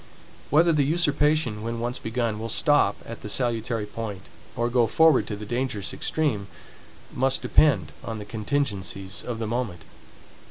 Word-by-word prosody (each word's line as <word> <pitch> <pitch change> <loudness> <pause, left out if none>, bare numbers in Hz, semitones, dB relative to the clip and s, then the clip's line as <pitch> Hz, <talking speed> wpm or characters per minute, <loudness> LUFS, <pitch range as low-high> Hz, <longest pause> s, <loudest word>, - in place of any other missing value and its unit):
Whether 165 +4 +5
the 150 - +3
usurpation, 150 -6 +2
when 115 +1 -3
once 120 +2 -3
begun, 110 -1 -2
will 115 +1 -4
stop 145 -5 +3
at 115 - -8
the 105 - -6
salutary 115 -1 0
point, 105 -2 -6 0.3
or 120 - 0
go 120 -1 +3
forward 160 +4 +4
to 105 - -3
the 105 +1 -8
dangerous 120 -3 -2
extreme, 135 -11 -1 0.7
must 135 +1 +1
depend 105 - +3
on 115 - -5
the 105 - -7
contingencies 105 -4 -2
of 120 -2 -4
the 115 - -3
moment. 110 -7 -3
115 Hz, 155 wpm, -25 LUFS, 105-135 Hz, 0.7 s, Whether